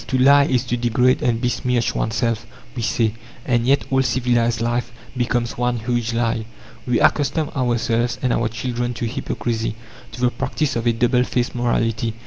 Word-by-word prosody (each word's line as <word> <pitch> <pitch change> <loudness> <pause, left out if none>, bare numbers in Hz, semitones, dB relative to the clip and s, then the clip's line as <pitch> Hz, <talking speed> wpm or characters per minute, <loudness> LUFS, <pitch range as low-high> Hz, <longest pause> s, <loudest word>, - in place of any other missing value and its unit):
"To 130 - 0
lie 140 +2 +6
is 125 -4 +1
to 120 -1 -2
degrade 125 +2 +2
and 115 -2 +1
besmirch 125 0 0
oneself," 115 0 -1 0.3
we 120 - -3
say, 110 -1 +1 0.3
and 120 -1 +1
yet 140 +1 +3
all 135 0 +3
civilized 120 -3 +1
life 120 +1 -1 0.2
becomes 120 -1 -1
one 125 0 +1
huge 120 0 -1
lie. 115 -1 0 0.4
We 125 -2 +2
accustom 145 +1 +2
ourselves 120 -2 0
and 125 - 0
our 115 - +1
children 120 +1 -3
to 120 - -3
hypocrisy, 115 -3 -3 0.4
to 125 - -8
the 125 -1 +3
practice 135 +3 -2
of 115 0 -1
a - - +5
double 125 +2 +2
faced 125 -1 -1
morality. 115 -2 0
120 Hz, 170 wpm, -21 LUFS, 115-125 Hz, 0.4 s, lie